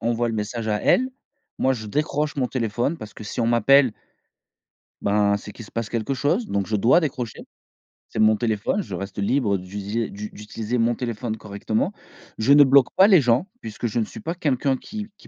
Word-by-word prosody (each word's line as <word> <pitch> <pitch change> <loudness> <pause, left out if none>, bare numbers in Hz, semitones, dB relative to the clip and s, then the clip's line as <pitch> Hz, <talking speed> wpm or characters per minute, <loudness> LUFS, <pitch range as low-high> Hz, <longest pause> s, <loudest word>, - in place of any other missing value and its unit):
envoie 120 +1 0
le 115 - -2
message 110 +1 -3
à 105 -1 0
elle.». 255 +1 +3 0.5
Moi, 130 - +2
je 110 -4 -5
décroche 150 +4 -1
mon 130 -2 +1
téléphone 120 +5 -1
parce 110 -5 -10
que, 110 - -9
si 120 - -4
on 115 - +1
m'appelle 125 +2 +5 1.1
ben, 100 0 +2
c'est 105 - -9
qu'il 115 - -10
se - - -15
passe 115 -2 -3
quelque 115 +4 -2
chose. 160 - 0
Donc, 100 -1 -1
je 110 - +1
dois 120 - +4
décrocher. 130 - -4 0.7
C'est - - -5
mon 110 0 +5
téléphone, 115 - 0
je - - -6
reste 100 +1 -7
libre 100 -2 +1
d'utiliser 100 +4 -4
du 105 +1 -7
d'utiliser 110 +3 -4
mon 115 0 +2
téléphone 115 -2 -3
correctement. 110 - -2 0.5
Je 125 +6 +4
ne 145 - +9
bloque 135 -1 +5
pas 190 +2 +7
les 190 -6 +7
gens, 125 +5 +2
puisque 110 +2 -5
je 115 +2 -1
ne 110 - +1
suis - - -10
pas 165 - -3
quelqu'un 140 -5 0
qui 210 +6 -7
qui - - -18
115 Hz, 205 wpm, -23 LUFS, 105-140 Hz, 1.1 s, ne